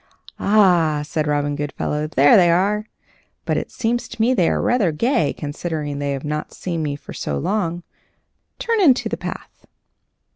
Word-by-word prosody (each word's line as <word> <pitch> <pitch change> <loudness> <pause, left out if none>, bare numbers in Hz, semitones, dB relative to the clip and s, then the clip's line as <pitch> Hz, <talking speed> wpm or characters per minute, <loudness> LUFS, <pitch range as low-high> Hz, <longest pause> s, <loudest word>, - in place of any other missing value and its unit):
"Ah!" 175 -8 +3
said 155 +1 -2
Robin 145 0 0
Goodfellow, 150 +1 -3
"there 145 -2 +5
they 175 -3 +6
are! 205 +5 +1 0.6
But - - 0
it - - -3
seems 240 +1 -2
to - - -11
me 235 +4 +3
they 180 -9 +2
are - - 0
rather 225 -9 +2
gay, 160 - +1
considering 150 -1 -4
they 140 -1 -1
have 135 +1 -5
not 150 0 -4
seen 170 -3 -3
me 145 -2 -2
for 145 - -11
so 70 - -3
long. 175 - -2 0.7
Turn 460 -3 0
into 275 -9 +4
the - - -3
path." - - -8
165 Hz, 170 wpm, -21 LUFS, 145-210 Hz, 0.7 s, they